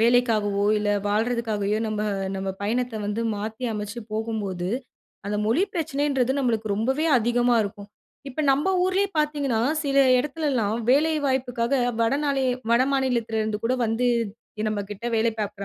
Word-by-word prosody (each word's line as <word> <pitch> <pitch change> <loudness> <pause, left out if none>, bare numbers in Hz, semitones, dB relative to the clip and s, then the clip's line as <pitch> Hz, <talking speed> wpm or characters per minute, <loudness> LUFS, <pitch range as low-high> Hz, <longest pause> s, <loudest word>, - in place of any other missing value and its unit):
வேலைக்காகவோ, 220 -4 +3
இல்ல 205 0 0 0.2
வாழ்றதுக்காகையோ 215 -1 0
நம்ப 210 -1 -2 0.3
நம்ப 190 0 -2
பயணத்த 240 +2 -1
வந்து 210 +2 -2 0.2
மாத்தி 220 +4 -5
அமைச்சு 210 +2 -5
போகும்போது, 210 -5 -3 0.6
அந்த 210 - -1
மொழி 275 - +3
பிரச்சனைன்றது 280 -5 0
நம்பளுக்கு 225 -5 0
ரொம்பவே 265 +8 0
அதிகமா 240 +1 +2
இருக்கும். 200 0 -7 0.4
இப்ப 270 - -4
நம்ப 285 +7 +1 0.2
ஊர்லயே 385 +2 +1
பார்த்தீங்கன்னா, 290 -6 0 0.2
சில 275 -1 +2 0.2
இடத்துலல்லாம் 265 -6 0
வேலை 310 +4 +4
வாய்ப்புக்காக 250 -1 0 0.3
வடநாலே 275 +2 +1 0.3
வடமாநிலத்திலேருந்து 235 -4 +1
கூட 250 +3 +2
வந்து 225 +3 0 0.6
நம்ப 215 -1 -1
கிட்ட 205 +3 -6
வேலை 225 +1 +2
பார்க்குற 200 -1 -4
235 Hz, 125 wpm, -24 LUFS, 215-270 Hz, 0.6 s, வேலை